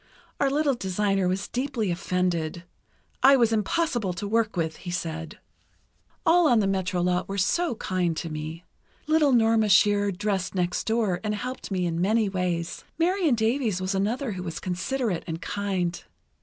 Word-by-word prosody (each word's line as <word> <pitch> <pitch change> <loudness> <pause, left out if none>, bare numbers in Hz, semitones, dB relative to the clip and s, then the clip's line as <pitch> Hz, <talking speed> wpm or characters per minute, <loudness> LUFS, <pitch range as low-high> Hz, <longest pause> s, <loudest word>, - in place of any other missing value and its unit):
Our 280 - +3
little 290 0 +2
designer 195 -3 0
was 185 +2 -1
deeply 245 -6 -2
offended. 175 -2 -1 0.6
I 275 +1 +7
was 235 -3 +3
impossible 225 - 0
to 200 +4 -5
work 220 -2 0
with, 160 -2 -1
he 180 - -8
said. 165 -2 -4 0.9
"All 340 0 +5
on 240 -3 +5
the 205 - +2
Metro 185 -2 0
lot 180 +1 0
were 195 - -3
so 330 - +1
kind 180 -5 -1
to 165 - -3
me. 155 +3 -6 0.4
Little 305 -2 +3
Norma 225 -3 +3
Shearer 205 +1 +4
dressed 195 -1 -2
next 180 -1 -1
door, 220 -5 +1
and 210 -1 -1
helped 250 +5 -5
me 185 -3 -1
in 170 0 -1
many 215 +2 +2
ways. 180 -2 -2
Marion 340 -4 +2
Davies 225 -3 0
was 185 +1 -2
another 220 +6 -1
who 185 -2 -5
was 170 -3 -5
considerate 185 +2 -2
and 165 -1 -4
kind. 185 -2 -2
195 Hz, 165 wpm, -26 LUFS, 180-235 Hz, 0.9 s, I